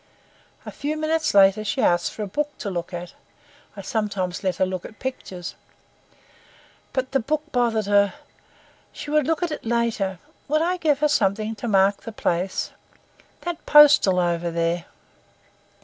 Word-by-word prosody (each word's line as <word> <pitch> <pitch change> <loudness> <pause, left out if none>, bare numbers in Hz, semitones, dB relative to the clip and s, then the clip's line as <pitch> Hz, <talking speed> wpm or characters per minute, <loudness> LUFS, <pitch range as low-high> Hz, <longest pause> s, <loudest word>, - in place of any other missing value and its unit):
A - - -6
few 300 +2 -3
minutes 310 -4 0
later 195 +2 +6
she 215 +5 -2
asked 175 -7 +2
for 215 - -5
a - - -4
book 295 +9 -3
to 200 - -4
look 175 0 -4
at—I 175 +3 -12
sometimes 200 -4 -2
let 185 -2 0
her 185 - +2
look 185 -1 -4
at 220 - -11
pictures. 190 -9 -6 1.4
But 260 -1 -2
the 270 - +2
book 300 +5 -1
bothered 235 -5 +1
her—she 200 +7 -3
would 300 -2 +2
look 325 +2 0
at 345 - -1
it 305 - -5
later; 225 -5 -1 0.3
would 310 +2 +2
I 360 +2 0
give 300 -4 +1
her 300 - +4
something 215 -5 +1
to 240 - -5
mark 195 -1 +3
the 225 - -7
place—that 195 - -5
postal 295 -11 +7
over 175 -1 0
there. 170 +1 -1
215 Hz, 150 wpm, -23 LUFS, 185-290 Hz, 1.4 s, postal